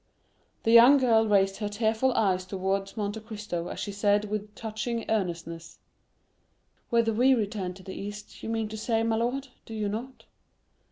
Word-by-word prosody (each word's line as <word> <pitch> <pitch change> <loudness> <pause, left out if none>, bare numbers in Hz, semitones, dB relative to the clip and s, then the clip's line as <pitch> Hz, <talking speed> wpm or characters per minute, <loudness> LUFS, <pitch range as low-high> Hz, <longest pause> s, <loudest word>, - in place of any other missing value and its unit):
The 225 - +2
young 240 +5 +9
girl 225 -4 +3
raised 195 -2 +3
her 210 -1 -3
tearful 220 +4 +1
eyes 190 -5 +2
towards 195 +2 -2
Monte 205 +1 -2
Cristo 210 -6 -5
as - - -6
she 205 - -3
said 205 +1 +1
with 210 0 -4
touching 225 +1 -4
earnestness, 170 -5 -3 1.1
"Whether 230 -1 +2
we 255 +4 +4
return 205 -5 -3
to 190 - -13
the 190 - -7
East, 205 +1 -8
you - - -5
mean 225 -1 -1
to 220 - -6
say, 225 +1 0
my 225 -1 +1
lord, 255 +4 -1
do 225 - -9
you 210 -1 -1
not?" 235 +6 -6
215 Hz, 170 wpm, -28 LUFS, 200-225 Hz, 1.1 s, young